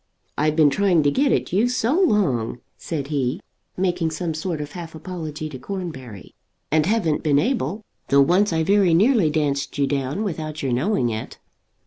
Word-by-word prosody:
"I've 155 +1 +1
been 155 -3 +5
trying 180 0 +3
to 145 - +3
get 275 - +2
at - - 0
you 220 +6 +3
so 250 +1 0
long," 150 - +1 0.2
said 145 -4 -5
he, 135 -3 -1 0.4
making 180 -3 0
some 160 +1 -3
sort 160 +1 -3
of 145 -1 -6
half 165 -2 -8
apology 155 -2 -6
to 130 -4 -8
Cornbury, 130 - -7 0.4
"and 155 +1 +2
haven't 190 -8 +1
been 145 -3 +2
able; 220 - -1 0.2
though 140 0 +5
once 185 +7 +3
I 160 -1 +1
very 195 -1 +3
nearly 210 - +4
danced 145 -2 -1
you 140 - +2
down 140 +7 -2
without 155 -6 -4
your 130 -3 0
knowing 130 - +1
it." 110 0 -5
160 Hz, 175 wpm, -22 LUFS, 145-190 Hz, 0.4 s, been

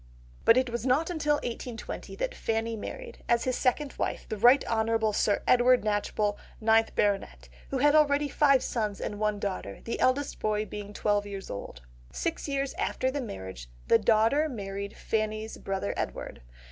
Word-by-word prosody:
But 230 - +7
it 255 -2 +2
was 235 0 -3
not 275 +7 +2
until 300 -3 +1
1820 240 -3 -6
that - - -2
Fanny 225 - -1
married, 475 - -8
as 235 0 +3
his 255 -1 0
second 275 +2 0
wife, - - -2
the - - -3
Rt. 245 +6 +6
Hon. 225 -1 +1
Sir 205 0 +1
Edward 250 -1 +5
Knatchbull, 205 0 0 0.2
9th 225 0 +3
Bt., 200 -1 +2 0.4
who 270 - -1
had 290 +3 +4
already 295 -1 +4
five 275 -2 +4
sons 215 -4 -2
and 205 - -4
one 210 -1 +1
daughter, 190 - -4
the 230 - -4
eldest 270 +2 +1
boy 215 0 0
being 205 -1 -7
twelve 205 0 0
years 195 -1 -7
old. - - -7 0.3
Six 330 -2 -3
years 275 -1 -1
after 260 - 0
the 285 +1 -2
marriage, 95 - -7 0.2
the - - +6
daughter 230 +8 +3
married 200 -4 -5
Fanny's 215 0 -2
brother 190 - -2
Edward. - - -5
225 Hz, 170 wpm, -28 LUFS, 205-270 Hz, 0.4 s, But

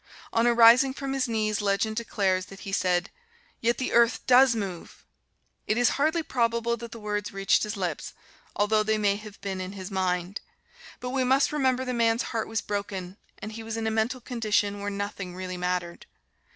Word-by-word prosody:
On 230 +1 +3
arising 240 +3 +6
from 275 -1 -4
his 270 -1 0
knees, 215 -2 0
legend 205 +2 0
declares 195 -5 0
that 195 - -12
he 195 - -6
said, 180 -1 +1 0.5
"Yet 235 +1 +1
the 255 - -2
earth 235 -1 +3
does 255 -1 +6
move!" 195 -6 -6 0.6
It 215 - +1
is 245 -1 +4
hardly 315 +4 +1
probable 235 -3 0
that 235 0 -9
the 230 - -8
words 210 -1 -3
reached 195 0 +2
his 210 0 -3
lips, 175 -6 -3 0.4
although 215 +1 +2
they 215 0 +1
may 205 -2 +2
have 210 -1 -11
been 195 -2 -4
in 185 +1 -6
his 190 0 -7
mind. 185 0 -1 0.6
But 250 - -5
we 265 0 +1
must 265 +2 +3
remember 260 -3 +1
the 250 - -2
man's 230 0 +2
heart 225 -1 -1
was 225 0 -2
broken, 195 -2 -4 0.2
and 215 - -7
he 225 +1 -7
was 225 0 -5
in 225 - -2
a 220 - 0
mental 225 +4 0
condition 215 -4 0
where 200 0 -3
nothing 200 -2 -5
really 185 0 -5
mattered. 180 -1 -3
215 Hz, 190 wpm, -27 LUFS, 195-235 Hz, 0.6 s, arising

